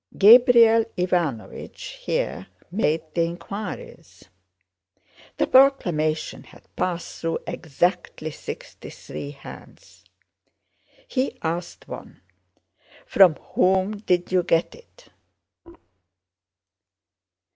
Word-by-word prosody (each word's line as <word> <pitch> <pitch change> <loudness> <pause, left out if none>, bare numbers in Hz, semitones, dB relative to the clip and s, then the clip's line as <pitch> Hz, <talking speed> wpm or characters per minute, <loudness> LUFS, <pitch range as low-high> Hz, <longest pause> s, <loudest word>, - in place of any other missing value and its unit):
Gabriel 230 +1 +7
Ivánovich 175 -10 -2 0.2
here 95 - -3 0.2
made 165 -5 0
the 170 - +1
inquiries. 190 +5 -7 1.1
The - - +2
proclamation 175 - +2
had - - -17
passed 175 -2 -3
through 165 0 -1
exactly 160 0 -2
sixty - - -9
three 145 - -8
hands. 140 -1 -13 1.0
He 265 - -2
asked 170 +2 -4
one, - - -10 0.8
'From 185 -5 +5 0.2
whom 190 +3 +2
did 180 -4 0
you 185 -1 +3
get 165 -1 +1
it? - - -19
180 Hz, 80 wpm, -23 LUFS, 165-220 Hz, 1.1 s, Gabriel